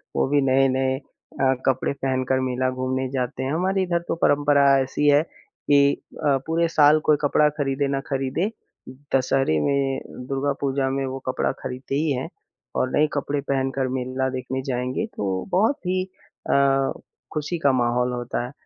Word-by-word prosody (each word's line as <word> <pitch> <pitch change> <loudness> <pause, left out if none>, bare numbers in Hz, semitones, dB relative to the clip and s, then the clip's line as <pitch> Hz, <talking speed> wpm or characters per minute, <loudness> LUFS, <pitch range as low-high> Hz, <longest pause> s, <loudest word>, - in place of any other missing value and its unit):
वो - - +2
भी 145 0 +3
नए-नए 130 0 +2
अ, 135 -1 -2
कपड़े 130 -1 +1
पहनकर 130 -1 0
मेला 130 0 0
घूमने 130 0 -2
जाते 130 0 -2
हैं। 135 +3 -2
हमारे 190 +3 +1
इधर 170 -1 0
तो - - -1
परंपरा 145 0 +4 0.2
ऐसी 145 +2 -1
है 145 +1 +5
कि 140 -3 +1 0.3
अ, 140 -1 +4
पूरे 165 +1 +2
साल 150 +1 +6
कोई 150 - +6
कपड़ा 150 +1 +3
ख़रीदे 140 0 0
ना 135 0 -1
ख़रीदे, 135 +8 -1 0.7
दशहरे 130 - +2
में, 140 -1 +1 0.3
दुर्गा 140 +1 0
पूजा 135 -1 0
में 135 0 -1
वो 130 0 -4
कपड़ा 130 - 0
ख़रीदते 130 +2 -5
ही 150 0 +1
हैं। 130 -1 -2 0.5
और 130 - +1
नए 150 +1 +4
कपड़े 145 0 -1
पहनकर 135 -1 -1
मेला 130 +1 -2
देखने 130 0 -4
जाएँगे 125 +1 -2
तो 95 -2 -2
बहुत 220 +10 +3
ही 185 0 +1 0.5
अ, - - +3 0.8
ख़ुशी 155 +3 -2
का 140 - +5
माहौल 125 0 +1
होता 120 0 -3
है। 125 - -8
135 Hz, 165 wpm, -23 LUFS, 130-145 Hz, 0.8 s, साल